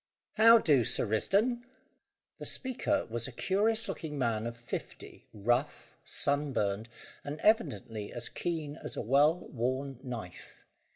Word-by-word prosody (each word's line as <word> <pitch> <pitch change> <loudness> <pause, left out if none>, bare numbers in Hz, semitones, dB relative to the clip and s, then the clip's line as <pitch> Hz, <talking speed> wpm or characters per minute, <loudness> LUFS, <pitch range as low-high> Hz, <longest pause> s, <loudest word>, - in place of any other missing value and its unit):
"How 230 +2 +9
do, 145 - +4
Sir - - +2
Risdon?" 200 - +1 0.8
The - - -6
speaker 260 -1 -1
was 115 +1 -3
a - - -7
curious 220 - +1
looking 150 -3 -5
man 115 -4 0
of 115 0 -6
fifty, 120 - -8
rough, 120 +7 -1
sunburned, 125 -7 -1 0.3
and 145 +2 -5
evidently 115 - +1
as 120 -1 -4
keen 160 -4 -4
as - - -6
a - - -1
well 145 +9 +3
worn 130 +2 -2
knife. 115 -9 -8
135 Hz, 130 wpm, -31 LUFS, 115-170 Hz, 0.8 s, How